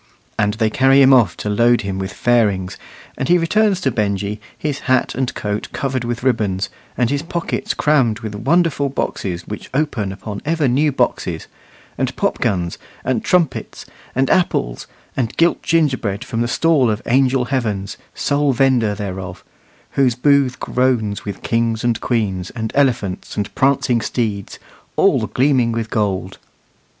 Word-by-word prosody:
And 105 0 +1
they 110 -1 +1
carry 135 +2 +4
him 135 0 +7
off 110 -10 +4
to - - -5
load 120 +3 +3
him 95 -1 -4
with 95 +1 -3
fairings; 105 -6 +1 0.4
and 130 - -2
he 175 - +6
returns 195 +3 +2
to 135 - +1
Benjy, 105 -1 -2 0.2
his 145 -2 -3
hat 130 - +2
and 130 -1 -1
coat 105 0 -3
covered 130 -2 -2
with 120 0 -3
ribbons, 105 -7 0 0.3
and 125 0 +1
his 140 0 0
pockets 170 +1 -3
crammed 130 -7 +2
with 110 -2 -5
wonderful 145 +5 +1
boxes 90 -9 -3
which 105 - -7
open 135 -10 0
upon 100 +1 -7
ever 155 -1 +1
new 145 +5 +2
boxes, 135 - -1 0.5
and - - -1
popguns, 90 -3 -1 0.3
and 130 -4 0
trumpets, 175 -6 0 0.3
and 135 +1 +2
apples, 115 - 0 0.3
and 120 -4 -2
gilt 170 +1 +3
gingerbread 130 -11 0
from 115 - -3
the 120 - +1
stall 145 -1 +3
of 105 0 -2
Angel 130 0 +2
Heavens, 110 -7 -2 0.2
sole 140 -1 +1
vender 120 -5 +2
thereof, 95 -3 -6 0.5
whose 130 -4 +2
booth 135 -1 +2
groans 120 -6 0
with 100 - -6
kings 115 -1 0
and 120 -2 0
queens, 95 -7 -1
and 110 -2 -3
elephants 125 -9 0
and 105 0 -2
prancing 135 -3 +2
steeds, 105 -4 -3 0.4
all - - +3
gleaming 130 -3 +2
with 115 -1 -3
gold. 95 -3 -1
120 Hz, 155 wpm, -19 LUFS, 105-135 Hz, 0.5 s, him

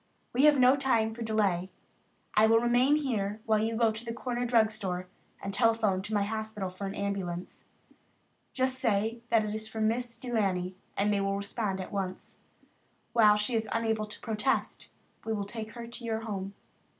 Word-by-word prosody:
We 260 +4 +4
have 300 -1 +6
no 255 +1 +6
time 230 -5 +1
to 235 - -9
delay. 200 -5 +1 0.6
I 215 +1 +5
will 225 +1 +5
remain 245 +4 +4
here 220 -8 -1
while 220 -1 +3
you 225 +1 0
go 225 -1 +3
to 220 +1 -6
the 230 -1 -5
corner 245 0 -2
drug 225 -2 +4
store 185 -4 -3 0.4
and 195 - -3
telephone 225 -4 +2
to 210 +3 -5
my 205 - +3
hospital 215 -2 -3
for 195 +2 -5
an 195 - -5
ambulance. 190 -3 -4 0.9
Just 260 0 +1
say 225 -1 0
that 225 -2 +3
it 210 - -3
is 220 0 -5
for 220 - -6
Miss 230 +2 0
De 250 -2 -6
Laney 185 -4 0 0.2
and 205 +1 +2
they 200 - +1
will 195 0 0
respond 200 -1 -2
at 185 - -6
once. 190 -2 -5 0.7
While 215 -3 +6
she 210 +4 0
is 225 -1 0
unable 220 -2 0
to 210 - -9
protest, 225 +4 -1 0.3
we 225 - -2
will 205 -2 -2
take 220 +1 -7
her 235 -1 -7
to 235 +1 -10
your 225 -1 -2
home." 200 -3 -5
220 Hz, 190 wpm, -30 LUFS, 200-235 Hz, 0.9 s, have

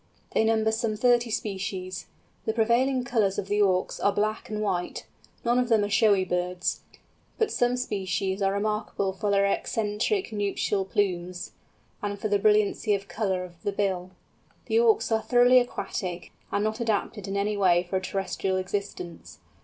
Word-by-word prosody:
They - - +2
number 220 0 +2
some 220 -1 -1
thirty 240 0 +3
species. 190 -3 -4 0.4
The 220 - 0
prevailing 245 +3 +2
colours 220 -6 +1
of 190 - -3
the 205 0 +2
Auks 185 -2 +1
are 200 - +3
black 215 +2 -1
and 215 -1 -3
white; 190 -4 -2 0.4
none 240 +1 +3
of 250 -1 0
them 220 -3 +4
are 205 - -1
showy 200 -4 +4
birds; 180 0 -1 0.6
but 440 -2 +1
some 245 - +1
species 195 -4 -2
are 195 0 +3
remarkable 200 -1 -1
for 205 +2 -2
their 200 0 +3
eccentric 220 - -1
nuptial 205 -1 0
plumes, 180 -2 -2 0.5
and 205 -1 -3
for 215 +2 -3
the 205 0 +2
brilliancy 210 0 +3
of 200 0 -6
colour 190 -4 -1
of 175 -2 -12
the 205 - -1
bill. 190 -3 -1 0.6
The 450 - +2
Auks 445 - +3
are 220 0 +2
thoroughly 245 +2 +5
aquatic, 180 -7 -4 0.2
and 205 - +1
not 215 +2 -1
adapted 215 -2 -1
in 195 +1 -2
any 205 +1 0
way 180 -3 +4
for 190 - 0
a - - -2
terrestrial 190 0 -2
existence. 185 -2 -5
205 Hz, 170 wpm, -27 LUFS, 190-220 Hz, 0.6 s, thoroughly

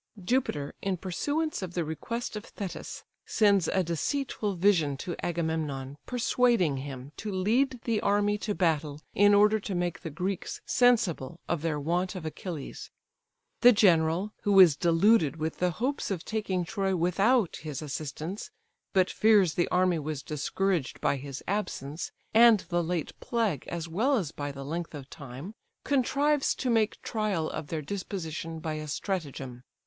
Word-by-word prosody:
Jupiter, 170 - 0
in 195 -2 -1
pursuance 290 - -2
of 180 -2 -6
the 170 -2 0
request 230 +10 -4
of 210 - -5
Thetis, 190 -4 -7 0.2
sends 200 -5 +3
a 190 - +1
deceitful 205 - -2
vision 170 -7 +3
to 175 +5 -4
Agamemnon, 160 -5 -2
persuading 235 - +2
him 135 0 -7
to 210 - -4
lead 235 +8 +1
the 225 -3 0
army 205 +1 +2
to 210 -1 -2
battle, 155 -4 0
in 205 0 +5
order 210 +1 +5
to 195 -1 -4
make 175 -1 -1
the 165 - -6
Greeks 180 +5 -3
sensible 195 - +2
of 170 -3 -1
their 155 -2 -1
want 175 +6 -1
of 180 -3 -6
Achilles. 155 -2 -6 0.7
The 245 - +8
general, 180 0 +3
who 200 -2 +4
is 175 -6 +8
deluded 170 0 +3
with 160 0 -3
the 180 - +2
hopes 250 - -2
of 185 -5 -3
taking 195 -5 -1
Troy 195 0 -1
without 195 +5 +2
his 150 -1 -6
assistance, 155 - -5 0.4
but 185 -2 +3
fears 205 -7 +4
the 175 - +1
army 180 -2 +2
was 150 -2 -4
discouraged 160 +2 -1
by 140 - +1
his 135 0 -7
absence, 165 -7 -3 0.2
and 230 -3 +7
the 175 -1 +1
late 170 -1 -2
plague, 220 - -1
as 170 -1 -4
well 235 - +2
as 170 -9 -2
by 145 -2 -4
the 135 0 -8
length 165 +2 -4
of 140 -2 -9
time, 140 - -8 0.3
contrives 280 +2 +2
to 255 - -1
make 220 -2 +2
trial 205 -8 -1
of 145 - -5
their 155 -1 -3
disposition 165 -3 -5
by 160 -1 -4
a 155 0 -5
stratagem. 145 -7 -4
180 Hz, 160 wpm, -28 LUFS, 155-210 Hz, 0.7 s, The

